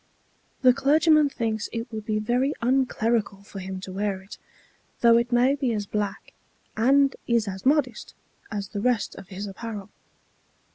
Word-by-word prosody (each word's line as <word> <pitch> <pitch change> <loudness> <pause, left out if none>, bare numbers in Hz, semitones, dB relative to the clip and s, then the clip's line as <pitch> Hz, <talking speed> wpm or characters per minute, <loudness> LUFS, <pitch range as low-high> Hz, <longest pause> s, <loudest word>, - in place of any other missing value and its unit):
The 255 -1 +7
clergyman 300 +2 +4
thinks 220 -4 -2
it 230 +1 -5
would 215 -1 -6
be 215 -1 0
very 245 +6 0
unclerical 235 -5 0
for 200 -1 -9
him 190 0 -6
to 190 - -7
wear 195 0 -2
it, 195 - -12 0.6
though 235 -1 +6
it 235 +1 0
may 245 +3 +4
be 270 -4 -1
as 210 -2 -2
black, 205 -1 -4 0.4
and 270 +4 +4
is 235 -2 +2
as 190 +4 -4
modest, 270 -6 +1 0.4
as 200 -3 -4
the 205 - -4
rest 240 -3 +1
of 190 - -11
his 195 +2 -6
apparel. 205 0 -7
230 Hz, 160 wpm, -25 LUFS, 205-255 Hz, 0.6 s, The